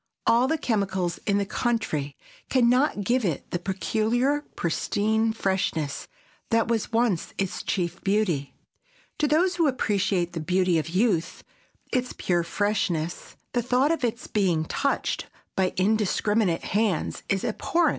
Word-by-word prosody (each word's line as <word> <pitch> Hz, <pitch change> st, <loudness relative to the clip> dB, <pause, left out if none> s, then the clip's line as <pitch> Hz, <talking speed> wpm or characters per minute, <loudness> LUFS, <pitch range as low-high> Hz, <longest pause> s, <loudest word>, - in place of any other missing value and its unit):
All 240 Hz, +3 st, +4 dB
the 320 Hz, -, +1 dB
chemicals 190 Hz, -, -1 dB
in 200 Hz, -1 st, +3 dB
the 200 Hz, -, +1 dB
country 195 Hz, -, -1 dB, 0.3 s
can 250 Hz, -3 st, +4 dB
not 250 Hz, -3 st, +2 dB
give 245 Hz, +4 st, +1 dB
it 165 Hz, -8 st, -2 dB
the 175 Hz, -, -1 dB
peculiar 225 Hz, +9 st, 0 dB
pristine 215 Hz, +6 st, +1 dB
freshness 190 Hz, -8 st, -1 dB, 0.4 s
that 230 Hz, -1 st, +2 dB
was 230 Hz, 0 st, -1 dB
once 225 Hz, -6 st, 0 dB
its 195 Hz, -2 st, -2 dB
chief 175 Hz, -2 st, -2 dB
beauty. 195 Hz, -9 st, 0 dB, 0.6 s
To 300 Hz, -, +3 dB
those 350 Hz, +5 st, +2 dB
who 330 Hz, -3 st, +3 dB
appreciate 195 Hz, -8 st, 0 dB
the 165 Hz, -, -3 dB
beauty 180 Hz, +1 st, +2 dB
of 155 Hz, +1 st, -4 dB
youth, 180 Hz, -2 st, 0 dB, 0.5 s
its 250 Hz, -1 st, 0 dB
pure 175 Hz, -2 st, 0 dB
freshness, 175 Hz, -3 st, -1 dB, 0.2 s
the 245 Hz, -, +2 dB
thought 250 Hz, +5 st, +2 dB
of 330 Hz, -5 st, -1 dB
its 235 Hz, 0 st, -1 dB
being 180 Hz, -6 st, +1 dB
touched 280 Hz, -, -1 dB, 0.3 s
by 185 Hz, -1 st, +2 dB
indiscriminate 205 Hz, -1 st, +1 dB
hands 205 Hz, -5 st, 0 dB
is 195 Hz, -1 st, +1 dB
abhorrent. 330 Hz, +8 st, +1 dB
205 Hz, 140 wpm, -26 LUFS, 180-240 Hz, 0.6 s, All